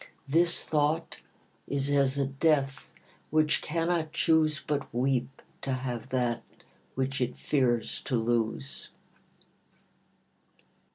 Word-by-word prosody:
This 170 +4 +3
thought 155 +2 0 0.5
is 140 -1 -1
as 140 -1 +3
a 140 - +2
death, 135 0 +1 0.4
which 155 0 +2
cannot 165 0 0
choose 160 -2 +3
But 145 -2 -3
weep 130 +1 -1 0.2
to 135 - -2
have 125 -2 -4
that 120 -3 0 0.5
which 135 +1 -1
it 125 0 0
fears 125 -5 0
to 130 - 0
lose. 115 +4 -1
140 Hz, 105 wpm, -29 LUFS, 130-155 Hz, 0.5 s, This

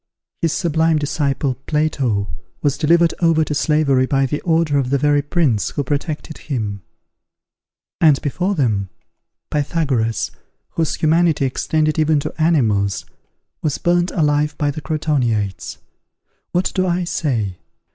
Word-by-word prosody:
His 165 - +1
sublime 160 -2 +1
disciple, 140 -2 0
Plato 135 -10 0 0.4
was 145 -2 +2
delivered 170 +3 +3
over 165 -2 +3
to 150 - -3
slavery 145 -3 +2
by 135 0 +2
the 145 +3 -3
order 160 -4 +2
of 130 -2 -1
the 140 - +2
very 145 +1 +3
prince 145 - +1
who 145 - -2
protected 150 +2 -3
him; 105 -8 -4 1.2
and, 155 -4 +5
before 180 +7 -1
them, 105 - 0 0.6
Pythagoras, 140 -7 0 0.4
whose 160 -3 -1
humanity 160 -2 +2
extended 155 +4 0
even 155 -1 +3
to - - -5
animals, 110 - +2 0.6
was 150 -3 -1
burned 175 +1 +1
alive 150 -2 +1
by 145 -1 0
the 155 - -7
Crotoniates. 130 - -1 0.7
What 180 +2 0
do 185 -1 +1
I 180 +1 0
say? 115 - -2
150 Hz, 130 wpm, -19 LUFS, 135-160 Hz, 1.2 s, and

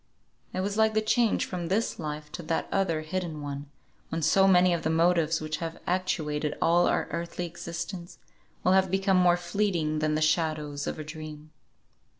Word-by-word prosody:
It 185 - -2
was 200 +2 -2
like 220 0 +3
the - - +5
change 220 +1 +2
from 175 -2 -4
this 210 +6 0
Life 150 -1 -5
to 175 - -6
that 165 0 -2
other 175 -5 +1
hidden 165 -1 -4
one, 140 0 -6 0.4
when 165 0 -3
so 190 +5 +5
many 180 -1 +5
of 170 - -1
the 160 - -1
motives 165 -1 +3
which 155 0 -3
have 165 -1 -5
actuated 155 -5 -1
all 175 +1 +4
our - - +1
earthly 170 +1 -3
existence, 170 +1 -6 0.5
will 180 - +4
have 190 0 +4
become 195 0 +2
more 175 -1 +5
fleeting 175 -4 0
than 155 0 +1
the - - +1
shadows 155 -2 0
of - - -3
a 155 - -5
dream. 155 0 -9
170 Hz, 180 wpm, -28 LUFS, 155-185 Hz, 0.5 s, the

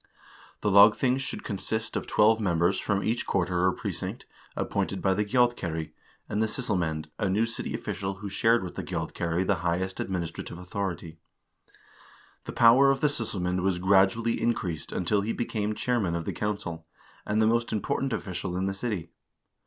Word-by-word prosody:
The 105 - +1
lagthing 105 +6 +6
should 135 - -5
consist 110 +2 -3
of - - -2
twelve 110 +1 +4
members 85 -1 +2
from 100 -1 0
each 115 +2 -1
quarter 90 -1 +1
or 95 - +4
precinct, - - -5 0.3
appointed - - -1
by 95 - +2
the 105 +2 +1
gjaldkeri, 100 -9 0 0.4
and 105 - -1
the 110 - +2
sysselmand, 85 - -2
a 105 -3 +1
new 105 +4 +2
city 115 - -4
official 95 0 -4
who 100 +2 -7
shared 115 +3 +2
with 90 - -6
the - - -5
gjaldkeri 85 +2 -2
the - - +2
highest 90 +2 -1
administrative 85 -2 -4
authority. 90 -3 -5 1.3
The - - -5
power 120 +4 +6
of 135 0 +1
the 150 - +4
sysselmand 95 -9 -1
was 95 -1 +1
gradually 95 +5 +3
increased 90 -9 -1
until 100 +3 +1
he 110 +3 -2
became 110 -3 -2
chairman 110 -10 0
of 85 -1 -3
the - - -3
council, 85 -6 -4 0.4
and 105 +1 0
the 110 - +4
most 115 +1 +1
important 130 +5 -1
official 95 -4 -3
in 95 - 0
the 95 - -1
city. 95 -5 -4
100 Hz, 170 wpm, -27 LUFS, 90-115 Hz, 1.3 s, lagthing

